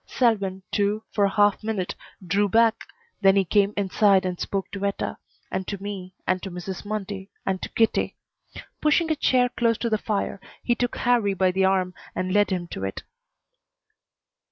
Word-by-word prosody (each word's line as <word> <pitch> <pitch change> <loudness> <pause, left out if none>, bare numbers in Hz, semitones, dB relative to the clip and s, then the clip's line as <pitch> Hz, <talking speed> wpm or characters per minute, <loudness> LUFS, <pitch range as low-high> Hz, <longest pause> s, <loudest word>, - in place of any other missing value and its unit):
Selwyn, 200 -6 +1
too, 205 +1 +1
for 205 - +2
a - - +2
half 205 +1 +3
minute 210 -4 -2 0.3
drew 200 +4 +2
back, 225 +2 +3 0.4
then 195 -1 +6
he 195 -1 +3
came 200 +3 +3
inside 195 0 +3
and 180 -1 -3
spoke 195 -1 -3
to 200 0 -5
Etta, 200 0 -2 0.3
and 190 - -3
to 200 - -4
me, 195 -2 -6
and 185 0 +1
to 195 - -5
Mrs. 180 +1 -6
Mundy, 205 -2 -5 0.2
and 190 -1 -1
to - - -4
Kitty. 225 -1 +1 0.7
Pushing 315 +2 +3
a - - +2
chair 255 -4 +3
close 230 -2 +1
to 235 - -2
the 215 - +2
fire, 200 -3 -2 0.2
he 240 - +2
took 245 0 -1
Harrie 230 -5 +2
by 185 0 +3
the 190 +1 +2
arm 185 -1 +1 0.2
and 185 0 -1
led 205 0 +4
him 180 -3 -2
to 95 - -6
it. 95 0 -4
200 Hz, 180 wpm, -25 LUFS, 190-215 Hz, 0.7 s, then